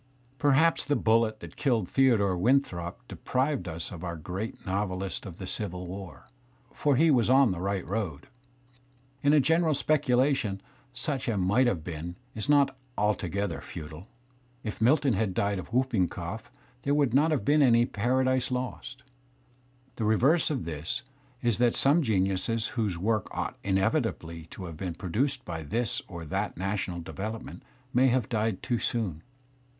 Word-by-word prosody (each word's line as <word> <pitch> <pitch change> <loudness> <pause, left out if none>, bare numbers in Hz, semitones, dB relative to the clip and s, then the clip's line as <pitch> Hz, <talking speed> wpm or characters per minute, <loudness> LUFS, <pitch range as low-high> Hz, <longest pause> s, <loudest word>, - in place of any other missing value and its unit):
Perhaps 145 +3 +3
the 145 - +1
bullet 110 -2 +2
that - - -10
killed 120 -9 +1
Theodore 115 -8 +3
Winthrop 90 -5 0
deprived 130 0 -1
us 80 -1 -5
of 90 -2 -8
our 85 -1 -3
great 90 +8 -6
novelist 95 -1 -2
of 90 -3 -9
the 95 - -6
Civil 90 -2 -3
War, 95 -2 -8 0.5
for 145 -2 +2
he 160 +4 +5
was 125 -4 +3
on 130 -3 +6
the 90 - -3
right 100 -1 -1
road. 95 -7 -3 1.0
In 145 - +4
a 150 - +6
general 160 +2 +3
speculation 135 -7 +2 0.3
such 130 +2 -3
a 115 -3 0
might 105 +8 +3
have 90 -9 0
been 85 +1 -6 0.2
is 110 +4 -4
not 145 -2 +4 0.2
altogether 100 -3 -1
futile; 80 +5 -9 0.6
if 110 0 -5
Milton 135 +2 +4
had 100 -2 0
died 100 -1 0
of 90 - -9
whooping 120 -7 +2
cough 90 +7 -6 0.3
there 140 +1 +1
would 140 -5 +2
not 150 +4 +4
have 145 -10 0
been 150 +3 +4
any 120 -3 +5
"Paradise 130 +3 +1
Lost"; 125 -2 -4 0.9
the 115 - -2
reverse 130 +10 +3
of 140 - -2
this 85 +7 -4 0.4
is 120 -2 +2
that 120 -1 +3
some 145 +5 +4
geniuses 105 - 0
whose 105 -8 -1
works 105 +3 0
ought - - -3
inevitably 95 - 0
to 95 - -8
have 80 -3 -8
been 90 -2 -4
produced 130 - -1
by 80 -2 -4
this 110 +9 -1
or 85 -2 -7
that 95 +4 -2
national 95 -2 -2
development 110 +6 -6 0.3
may 130 +2 +5
have 125 -3 +2
died 110 -4 -1
too 120 -3 0
soon. 95 -10 -2
110 Hz, 160 wpm, -28 LUFS, 95-130 Hz, 1.0 s, on